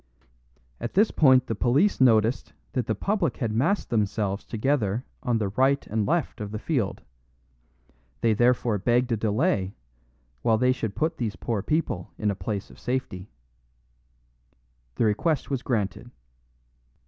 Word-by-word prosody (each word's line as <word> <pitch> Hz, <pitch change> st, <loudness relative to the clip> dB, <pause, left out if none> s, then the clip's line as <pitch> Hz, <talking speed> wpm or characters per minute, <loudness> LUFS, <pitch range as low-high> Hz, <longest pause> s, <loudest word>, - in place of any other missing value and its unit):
At 120 Hz, -, -5 dB
this 210 Hz, +3 st, +4 dB
point 130 Hz, -4 st, +5 dB
the -, -, -2 dB
police 135 Hz, -, +2 dB
noticed 115 Hz, -1 st, +3 dB, 0.2 s
that 125 Hz, -, -1 dB
the 110 Hz, -, 0 dB
public 180 Hz, -, -1 dB
had 115 Hz, -4 st, -1 dB
massed 155 Hz, -, 0 dB
themselves 105 Hz, -2 st, 0 dB
together 115 Hz, -2 st, -1 dB, 0.2 s
on 125 Hz, -3 st, +1 dB
the 105 Hz, -3 st, -1 dB
right 135 Hz, +7 st, +2 dB
and 110 Hz, -1 st, -1 dB
left 165 Hz, -8 st, -1 dB
of 105 Hz, -, -4 dB
the 110 Hz, -, -4 dB
field; 115 Hz, -5 st, -2 dB, 1.2 s
they 115 Hz, -1 st, +3 dB
therefore 120 Hz, -1 st, +2 dB
begged 120 Hz, +4 st, +1 dB
a -, -, +3 dB
delay, 105 Hz, -, 0 dB, 0.7 s
while 110 Hz, -, +3 dB
they 125 Hz, +3 st, +3 dB
should 115 Hz, -5 st, -3 dB
put 160 Hz, +1 st, -1 dB
these 115 Hz, -4 st, -2 dB
poor 115 Hz, -4 st, -2 dB
people 125 Hz, -, -1 dB
in 105 Hz, -1 st, 0 dB
a -, -, -3 dB
place 100 Hz, 0 st, -4 dB
of -, -, -16 dB
safety. 115 Hz, -7 st, -3 dB, 1.7 s
The -, -, +1 dB
request 140 Hz, +9 st, 0 dB
was 135 Hz, -3 st, -1 dB
granted. 110 Hz, -7 st, -2 dB
120 Hz, 150 wpm, -26 LUFS, 105-135 Hz, 1.7 s, point